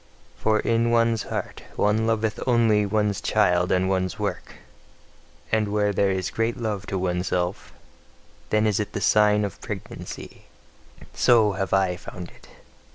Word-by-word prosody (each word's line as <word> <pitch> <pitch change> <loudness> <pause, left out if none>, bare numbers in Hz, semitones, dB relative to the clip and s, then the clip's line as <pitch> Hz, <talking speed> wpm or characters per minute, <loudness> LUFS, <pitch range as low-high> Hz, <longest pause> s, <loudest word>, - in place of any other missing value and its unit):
For 110 0 +1
in 115 0 +1
one's 115 -1 +2
heart - - -5
one 110 +2 +1
loveth 110 -1 0
only 115 -4 +3
one's 105 -1 0
child 90 -4 +2
and 95 0 +2
one's 95 -2 -1
work; - - -4 1.0
and 110 -1 +2
where 105 -1 +1
there 100 0 +2
is 95 -1 -2
great 115 +1 -1
love 105 -4 -3
to 95 - -2
oneself, 90 0 -2 0.8
then 110 0 +2
is 105 -1 +1
it 105 - -3
the - - -2
sign 105 -1 +4
of 100 - -7
pregnancy: - - -8 0.7
so 110 -4 +4
have 95 -1 -3
I 95 -2 +2
found 90 -1 -9
it. - - -19
105 Hz, 150 wpm, -24 LUFS, 95-110 Hz, 1.0 s, sign